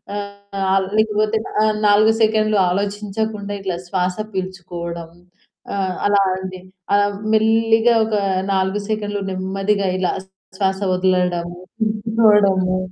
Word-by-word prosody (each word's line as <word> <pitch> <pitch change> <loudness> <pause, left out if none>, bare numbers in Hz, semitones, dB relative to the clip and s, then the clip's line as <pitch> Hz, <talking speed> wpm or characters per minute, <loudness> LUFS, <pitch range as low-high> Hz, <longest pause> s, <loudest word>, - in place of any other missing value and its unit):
ఆహ్, 200 -1 -2
లేకపోతే 215 0 +2 0.5
4 215 +2 +5
సెకన్లు 215 -1 +3
ఆలోచించకుండా 205 +2 -3
ఇట్లా 185 -3 -3
శ్వాస 180 0 -1 0.2
పీల్చుకోవడం, 175 -3 -5 0.6
ఆహ్, 190 -2 -1
అలా 200 -1 +4
అండి 185 -1 -7 0.7
మెల్లిగా 225 +1 +3
ఒక 220 -1 -1 0.4
4 190 +2 0
సెకండ్లు 205 -1 -2
నెమ్మదిగా 195 +1 -1
ఇలా 180 - 0 0.4
శ్వాస 190 -1 0
వదలడం 180 -2 +1 0.4
తిప్పుకోవడము. 210 -4 +3
200 Hz, 95 wpm, -20 LUFS, 185-215 Hz, 0.7 s, 4